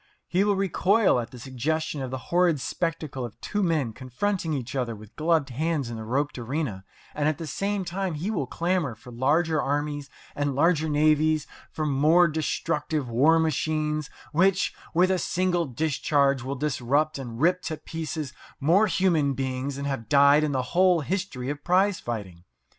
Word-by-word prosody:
He 180 +2 +2
will 205 -1 +2
recoil 195 - +3
at 115 - -4
the 125 - -11
suggestion 140 +5 -2
of 130 - -3
the 130 - -3 0.2
horrid 175 -4 +4
spectacle 155 -2 -3
of 120 -3 -8
two 210 - -2
men 155 - 0
confronting 160 - -2
each 135 -2 -3
other 120 -4 -1
with 105 0 -14
gloved 155 -2 +1
hands 150 -1 -1
in - - -5
the 110 - -6
roped 135 +4 -1
arena, 120 -5 -3 0.3
and 150 0 0
at 155 - -2
the 165 - -6
same 195 +5 -2
time 185 -1 -2
he 175 +8 -2
will 160 - -2
clamour 170 -5 -1
for 120 +3 -13
larger 150 +6 +1
armies 145 0 -2 0.3
and 145 -2 -1
larger 160 +1 +2
navies, 155 +1 +3 0.2
for 155 - -3
more 155 +5 +4
destructive 155 -2 -2
war 145 +8 +5
machines, 155 -1 0 0.2
which, 185 +4 +2 0.2
with 185 +2 +4
a 185 - +1
single 175 -2 0
discharge, 140 0 +1
will 135 +3 -4
disrupt 145 +2 0
and 120 -3 -7
rip 180 +4 +3
to 160 -3 -4
pieces 155 -3 -5 0.3
more 180 +10 +4
human 170 -7 +2
beings 130 +1 -3
than 140 +1 -4
have 135 -6 -4
died 140 +2 +6
in 150 - 0
the 130 -2 0
whole 180 -2 +4
history 150 -6 -3
of 145 0 -7
prize 185 +2 +2
fighting. 100 -7 -6
150 Hz, 175 wpm, -26 LUFS, 135-170 Hz, 0.3 s, died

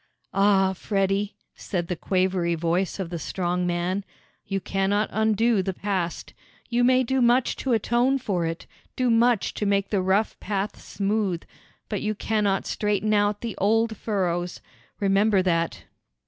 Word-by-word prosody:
"Ah, 195 -1 +4
Freddie," 195 +1 -1 0.2
said 175 -4 -3
the 180 - -2
quavery 185 -1 0
voice 170 +3 0
of 180 -3 -4
the 170 - -3
strong 180 +2 -1
man, 175 +3 -1 0.4
"you 195 -1 -1
cannot 195 +3 0
undo 220 0 +2
the 190 0 -3
past. 185 -4 -3 0.4
You 240 +1 +2
may 255 +1 +4
do 265 +1 0
much 245 +1 +3
to 265 - -2
atone 240 +4 +2
for 200 -9 -1
it, 165 0 -5 0.3
do 255 -2 +1
much 230 -2 +3
to 210 - -3
make 200 0 +1
the 200 -3 +2
rough 190 +4 +1
path 200 0 -3
smooth, 200 -4 -1 0.4
but 205 -3 -3
you 215 0 -1
cannot 205 -2 0
straighten 210 0 0
out 205 0 +2
the 230 -3 -4
old 225 +2 +2
furrows; 180 -5 -2 0.4
remember 200 0 +3
that." 165 - 0
200 Hz, 150 wpm, -25 LUFS, 185-220 Hz, 0.4 s, Ah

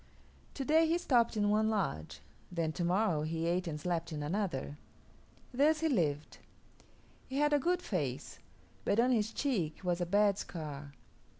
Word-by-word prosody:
To 270 - -3
day 320 +3 +4
he 330 +2 +2
stopped 240 -9 +2
in 205 0 +2
one 215 +1 +3
lodge; 80 - -2 0.3
then 165 -3 -1
to 175 - -3
morrow 175 -2 +2
he 160 +1 -2
ate 175 +2 0
and 150 -2 -4
slept 170 0 -2
in 150 -1 -4
another. 150 -5 -2 0.7
Thus 300 +4 +3
he 325 - +2
lived. 155 - -1 0.9
He 265 - -4
had 295 +1 +3
a 290 - +4
good 360 +5 0
face, 145 - -3 0.4
but 205 - +1
on 250 +2 +4
his 220 -3 +1
cheek 215 - -1
was 180 -1 0
a 175 - -1
bad 205 +1 +3
scar. 145 -4 -7
185 Hz, 170 wpm, -33 LUFS, 155-245 Hz, 0.9 s, day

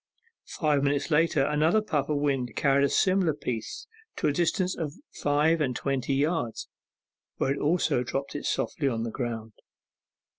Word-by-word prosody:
Five 150 -3 +2
minutes 140 +2 0
later 150 -3 +3
another 155 +7 +3
puff 155 -10 -1
of 150 - +1
wind 135 -5 -1
carried 140 -1 +3
a - - +1
similar 185 -5 +2
piece 115 -6 -5 0.3
to - - -3
a - - +3
distance 180 +3 +1
of 150 -3 -4 0.2
five 150 +3 +2
and 130 -4 0
twenty 135 0 -1
yards, 145 -4 -1 0.7
where 135 - +1
it - - -5
also 165 0 +2
was 125 - -4
dropped 140 +2 -3
softly 145 -5 -1
on 115 -4 -1
the 115 - -3
ground. 115 -3 -4
145 Hz, 160 wpm, -27 LUFS, 135-160 Hz, 0.7 s, later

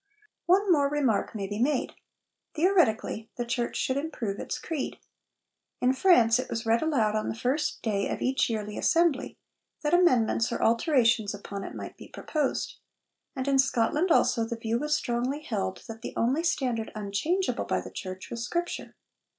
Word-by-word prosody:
One 380 +2 +4
more 285 -4 +4
remark 270 -8 0
may 200 -2 -3
be 205 +2 -4
made. 265 +2 +1 0.6
Theoretically, 300 - +2
the 240 - -3
Church 235 0 -1
could 260 - 0
improve 255 -9 -3
its - - -4
creed. 310 -4 -4 0.8
In 250 +1 +3
France 260 -7 +5
it 255 - -4
was 225 0 -3
read 225 +1 +3
aloud 235 -10 +1
on 215 - -1
the - - -3
first 260 +6 -1
day 200 -3 0
of - - -3
each 260 0 +1
yearly 210 -2 -3
Assembly, 330 -5 +2 0.5
that 300 +2 0
amendments 250 -10 +3
or - - -2
alterations 230 - +3
upon 200 0 -7
it - - -7
might - - -7
be - - -11
proposed; 300 -4 -2 0.6
and 260 0 -3
in 275 -1 +3
Scotland 270 +6 +2
also 230 -6 +3
the 230 +1 -3
view 225 +1 -1
was 300 +2 +1
strongly 255 +1 -1
held 195 -7 -3
that 225 0 -8
the - - -7
only 265 +8 +1
standard 250 -9 -1
unchangeable 215 - -1
by - - 0
the - - -8
Church 185 -1 -7
was 235 -1 -4
Scripture. 345 +8 -3
245 Hz, 170 wpm, -28 LUFS, 225-300 Hz, 0.8 s, France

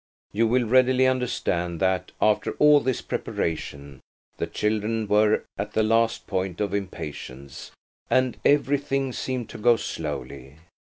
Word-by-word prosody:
You 115 +2 +2
will 125 +2 +2
readily 130 +2 +4
understand 90 -9 -1
that, 95 -1 0
after 105 -1 +2
all 150 0 +6
this 130 -3 -2
preparation, 70 -4 -4 0.4
the - - -2
children 110 +1 -1
were 105 +1 +3 0.2
at 100 - -4
the 110 - +2
last 115 +1 +1
point 95 -2 -3
of 100 -2 -1
impatience, 75 -8 -6 0.4
and 130 -1 +2
everything 140 -2 +1
seemed 125 -3 -4
to - - -9
go 120 +2 +5
slowly. 70 - -6
110 Hz, 130 wpm, -25 LUFS, 90-125 Hz, 0.4 s, all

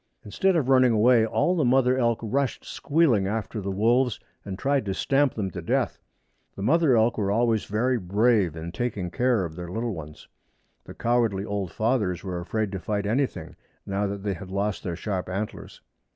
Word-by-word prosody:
Instead 190 - +1
of 150 -6 +1
running 130 -2 +5
away 115 +1 +4
all 115 +12 +1
the 160 - +1
mother 130 0 +3
elk 115 -3 +1
rushed 130 +4 -1
squealing 140 -11 +1
after 110 +1 -3
the 100 - -4
wolves 115 +5 +2 0.2
and 95 -2 -6
tried 140 +4 +1
to 95 -2 -3
stamp 135 +3 +1
them 95 -4 -3
to - - -6
death. - - -1 0.6
The 95 - -6
mother 145 +1 +4
elk 115 +1 +2
were 100 -2 0
always 115 +1 +1
very 120 +4 0
brave 100 -2 +2
in 80 +1 -6
taking 100 -4 -3
care 120 -1 +1
of 80 -2 -8
their 90 0 -7
little 115 +4 -3
ones. 75 -3 -10 0.6
The - - -11
cowardly 115 -5 +1
old 100 -4 -3
fathers 110 -5 0
were 90 -3 -4
afraid 105 +4 -2
to 95 - -4
fight 100 +3 -2
anything, 125 +6 -2 0.3
now 100 +1 -1
that 100 0 -5
they 100 -1 -1
had 90 +1 -9
lost 100 +1 -2
their 85 -2 -4
sharp 95 0 -4
antlers. 100 +3 -5
110 Hz, 190 wpm, -25 LUFS, 95-125 Hz, 0.6 s, running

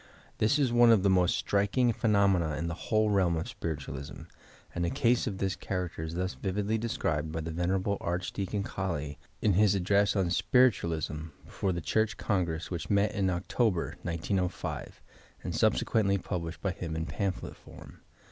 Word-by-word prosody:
This 110 +7 +3
is 135 -5 +1
one 120 0 +6
of 105 -5 +4
the 100 - +4
most 90 -2 +3
striking 100 +5 +2
phenomena 100 -8 +2
in 85 - -2
the 85 - -2
wliole 110 +4 +1
realm 90 -4 +2
of 80 - -3
spiritualism, 70 -4 -6 0.5
and 85 - -2
a 85 - +1
case 120 +7 +2
of 100 -4 -3
this 95 0 -1
character 90 -4 -4
is 80 +1 -5
thus 90 +1 -1
vividly 105 +3 -1
described 80 -9 -1
by 80 +1 -3
the 80 +1 -4
Ven. 85 +2 -1 0.3
Archdeacon 95 +3 -2
Colley 80 -8 -4 0.2
in 105 - +4
bis 100 +1 +4
address 100 +2 +2
on 95 -3 +1
"Spiritualism" 85 - +2 0.2
before 95 - -2
the 85 -1 -3
Church 110 +6 0
Congress 85 -5 -1
which 85 -2 -4
met 100 +1 +3
in 95 -2 0
October, 90 +1 0
1905, 90 +2 -3 0.4
and - - -3
subsequently 100 -3 +2
published 90 -3 -5
by 100 - +1
him 85 -3 -5
in 80 0 -2
pamphlet 95 +1 -3
form. - - -14
95 Hz, 165 wpm, -30 LUFS, 85-105 Hz, 0.5 s, one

